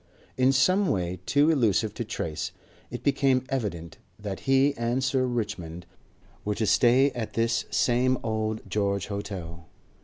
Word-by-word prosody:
In 130 +1 +4
some 185 +9 +3
way 90 -1 -1
too 145 +3 +4
elusive 110 -6 +2
to 120 - -4
trace, 85 -8 -4 0.4
it - - -7
became 135 -2 +2
evident 95 - -4 0.2
that 100 -2 -5
he 135 +1 +4
and 120 +2 -1
Sir 130 -1 +1
Richmond 100 -8 -4 0.6
were 105 0 -1
to 110 - 0
stay 130 +6 +4
at 120 -3 -5
this 115 +1 0
same 125 +1 +2
Old 110 -1 -2
George 100 -2 -1
Hotel. 90 -5 -6
115 Hz, 145 wpm, -26 LUFS, 100-130 Hz, 0.6 s, In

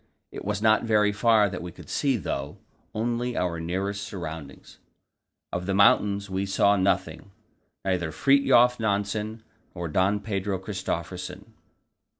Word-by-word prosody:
It - - -7
was 105 +1 -2
not 110 -1 +4
very 105 -2 +3
far 105 0 +4
that 95 -2 -5
we 90 0 -6
could - - -14
see, 135 -3 +1
though; 70 -7 -4 0.4
only 120 +2 -1
our 85 -2 -1
nearest 95 +4 -2
surroundings. 80 -8 -8 0.7
Of 90 +1 -3
the 95 - 0
mountains 100 0 +4
we 95 +1 -2
saw 100 +1 +3
nothing, 100 +1 0 0.6
neither 90 -4 0
Fridtjof 125 - +4
Nansen 105 +1 -2 0.3
nor 85 -1 -4
Don 95 +6 +2
Pedro 100 -2 -2
Christophersen. 95 +1 -5
100 Hz, 135 wpm, -26 LUFS, 90-110 Hz, 0.7 s, not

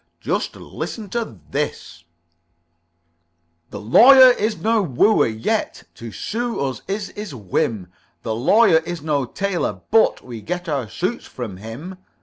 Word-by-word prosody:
"Just - - -2
listen 215 -4 -7
to 230 - -4
this: 85 +5 -4 1.6
"The - - -7
Lawyer 255 - +8
is 215 -2 -1
no 225 0 +1
wooer, 195 - +3
yet 110 0 -2
To 115 -1 -9
sue 235 - -3
us 130 -3 -3
is 200 0 -3
his 205 -8 -8
whim. 105 -1 -2 0.4
The 115 - -2
Lawyer 160 - +4
is 170 -1 -7
no 145 -4 0
tailor, 195 +7 -3
but 225 0 +3
We 120 -3 -8
get 180 - -5
our 140 -8 -2
suits 185 - -3
from 110 -7 -7
him. 135 - -9
170 Hz, 135 wpm, -21 LUFS, -, 1.6 s, Lawyer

